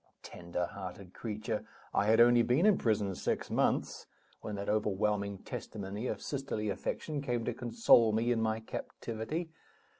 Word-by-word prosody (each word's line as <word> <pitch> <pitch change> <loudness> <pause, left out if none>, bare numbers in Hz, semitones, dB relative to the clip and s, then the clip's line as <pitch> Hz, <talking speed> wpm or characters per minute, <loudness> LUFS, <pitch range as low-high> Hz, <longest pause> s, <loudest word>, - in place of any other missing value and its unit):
Tenderhearted 90 +2 -5
creature! 110 0 -3 0.3
I 100 - +3
had 110 +1 +5
only 120 0 +7
been 125 - +3
in 210 -3 +5
prison 105 -4 +1
six - - -2
months - - 0 0.3
when 105 - -5
that 100 0 -5
overwhelming 105 -1 0
testimony 105 +3 -5
of - - -3
sisterly 130 -7 -2
affection 150 +8 -3
came 120 -4 -1
to 120 - -1
console 120 - +4
me 115 +3 +1
in 115 -2 +1
my 110 0 0
captivity. 115 +9 -5
110 Hz, 145 wpm, -32 LUFS, 100-120 Hz, 0.3 s, only